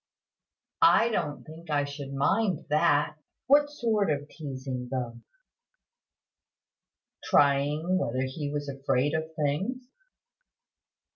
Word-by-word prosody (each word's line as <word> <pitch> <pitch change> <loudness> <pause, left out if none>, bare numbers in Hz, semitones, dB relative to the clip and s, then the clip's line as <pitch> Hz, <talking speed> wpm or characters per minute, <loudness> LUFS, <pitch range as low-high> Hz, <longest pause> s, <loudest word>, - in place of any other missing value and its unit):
"I 280 -8 +6
don't 155 -10 -2
think 160 +2 -12
I 145 -1 +2
should 140 -1 -7
mind 180 +7 +1
that. 150 0 +2 0.3
What 290 +2 +5
sort 225 - 0
of 145 -1 -1
teasing, 130 -4 -6
though?" 120 -3 -4 2.1
"Trying 145 +6 +3
whether 130 -4 -1
he 145 +3 -4
was 145 0 -3
afraid 135 +1 0
of 160 0 -3
things." 185 - -1
145 Hz, 100 wpm, -28 LUFS, 140-175 Hz, 2.1 s, I